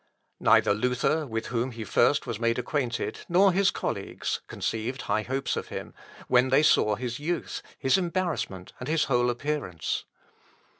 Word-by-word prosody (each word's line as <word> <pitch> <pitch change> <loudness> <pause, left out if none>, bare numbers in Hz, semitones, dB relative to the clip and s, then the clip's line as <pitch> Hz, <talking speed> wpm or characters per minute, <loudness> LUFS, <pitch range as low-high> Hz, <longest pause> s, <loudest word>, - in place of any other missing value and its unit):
Neither 100 - +5
Luther, 125 +7 0
with 115 -2 -3
whom 120 +2 -1
he 115 -1 -6
first 120 +7 +3
was 120 -4 -4
made 115 0 +1
acquainted, 125 -1 -2
nor 190 +3 +5
his 195 0 +4
colleagues, - - -3
conceived 115 +4 -3
high 105 +2 0
hopes 130 +2 -2
of - - -4
him, - - -7 0.3
when 125 +1 +4
they 135 +3 +4
saw 105 -7 +4
his 120 +2 -4
youth, 165 +3 -3 0.2
his 135 +8 +3
embarrassment, 170 - -2
and 125 - -5
whole 135 -6 +2
appearance. 120 - -2
125 Hz, 150 wpm, -27 LUFS, 115-150 Hz, 0.3 s, Neither